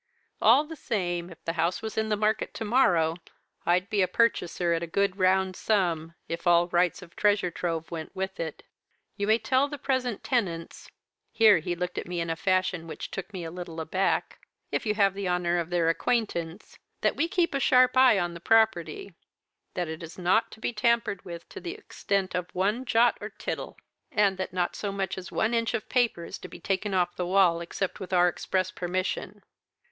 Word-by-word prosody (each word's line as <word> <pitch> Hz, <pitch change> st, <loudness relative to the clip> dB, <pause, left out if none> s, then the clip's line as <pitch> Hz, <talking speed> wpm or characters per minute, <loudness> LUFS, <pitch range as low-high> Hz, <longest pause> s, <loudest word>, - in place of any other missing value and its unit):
All 245 Hz, +7 st, +6 dB
the 320 Hz, +1 st, -9 dB
same, 175 Hz, -, -2 dB
if 165 Hz, -, -15 dB
the 165 Hz, -, -1 dB
house 170 Hz, +3 st, 0 dB
was 220 Hz, -, -4 dB
in 220 Hz, 0 st, 0 dB
the 210 Hz, -, +2 dB
market 215 Hz, +1 st, 0 dB
to 225 Hz, -, -4 dB
morrow, 175 Hz, -9 st, +3 dB, 0.5 s
I'd 180 Hz, +2 st, +3 dB
be 210 Hz, -2 st, +1 dB
a 185 Hz, -, +3 dB
purchaser 175 Hz, -7 st, +1 dB
at 165 Hz, -, 0 dB
a 170 Hz, -, -3 dB
good 200 Hz, +3 st, 0 dB
round 190 Hz, 0 st, +3 dB
sum 170 Hz, -6 st, 0 dB
if 170 Hz, +2 st, -4 dB
all 175 Hz, 0 st, +5 dB
rights 175 Hz, +1 st, +1 dB
of 170 Hz, -, -16 dB
treasure 205 Hz, -4 st, +2 dB
trove 165 Hz, -1 st, -3 dB
went 160 Hz, -2 st, -6 dB
with 190 Hz, 0 st, -4 dB
it. 160 Hz, -2 st, -5 dB, 0.5 s
You 200 Hz, -, -2 dB
may 220 Hz, +1 st, +5 dB
tell 260 Hz, +3 st, +2 dB
the 290 Hz, 0 st, -6 dB
present 255 Hz, -5 st, -1 dB
tenants' 175 Hz, -10 st, -2 dB, 0.4 s
here 215 Hz, -6 st, +6 dB
he 175 Hz, +3 st, -3 dB
looked 180 Hz, +1 st, -3 dB
at -, -, -7 dB
me 175 Hz, 0 st, -3 dB
in 165 Hz, -1 st, -1 dB
a -, -, -1 dB
fashion 185 Hz, -1 st, 0 dB
which 155 Hz, -, -7 dB
took 195 Hz, +2 st, -6 dB
me 185 Hz, -3 st, -6 dB
a 165 Hz, -, -6 dB
little 175 Hz, -2 st, -7 dB
aback 185 Hz, +4 st, -1 dB, 0.3 s
'if -, -, -1 dB
you 210 Hz, -, +1 dB
have 200 Hz, -2 st, +3 dB
the 195 Hz, -2 st, -3 dB
honour 175 Hz, -1 st, +1 dB
of 170 Hz, -1 st, -3 dB
their 175 Hz, -2 st, +1 dB
acquaintance, 175 Hz, -2 st, -1 dB, 0.2 s
that -, -, +2 dB
we 330 Hz, -, +1 dB
keep 350 Hz, -3 st, +1 dB
a 275 Hz, -, +1 dB
sharp 255 Hz, -1 st, +4 dB
eye 255 Hz, -4 st, +6 dB
on 175 Hz, -2 st, -1 dB
the 170 Hz, -, -8 dB
property; 200 Hz, -4 st, +2 dB, 0.6 s
that 175 Hz, -2 st, -1 dB
it 160 Hz, 0 st, -6 dB
is 165 Hz, 0 st, -9 dB
not 185 Hz, +5 st, +2 dB
to -, -, -13 dB
be 240 Hz, -, -2 dB
tampered 230 Hz, -3 st, +1 dB
with 170 Hz, -2 st, -8 dB
to -, -, -8 dB
the 355 Hz, +2 st, -6 dB
extent 200 Hz, -, -2 dB
of 180 Hz, -1 st, -2 dB
one 210 Hz, +7 st, 0 dB
jot 235 Hz, 0 st, +3 dB
or -, -, -5 dB
tittle; -, -, -5 dB, 0.3 s
and 200 Hz, -3 st, +2 dB
that 190 Hz, -, -3 dB
not 180 Hz, -1 st, -1 dB
so 205 Hz, -, -3 dB
much 195 Hz, -2 st, -2 dB
as 185 Hz, -1 st, -8 dB
one 225 Hz, +2 st, 0 dB
inch 230 Hz, -1 st, +1 dB
of 215 Hz, -, -4 dB
paper 240 Hz, -9 st, +1 dB
is -, -, -7 dB
to -, -, -8 dB
be -, -, -11 dB
taken 195 Hz, +1 st, -1 dB
off 175 Hz, -1 st, +1 dB
the 180 Hz, -, -2 dB
wall 180 Hz, -3 st, +4 dB
except 180 Hz, +2 st, -3 dB
with 190 Hz, -2 st, -7 dB
our 180 Hz, -1 st, +5 dB
express 185 Hz, +1 st, -1 dB
permission.'" 185 Hz, +2 st, -3 dB
185 Hz, 210 wpm, -27 LUFS, 175-220 Hz, 0.6 s, All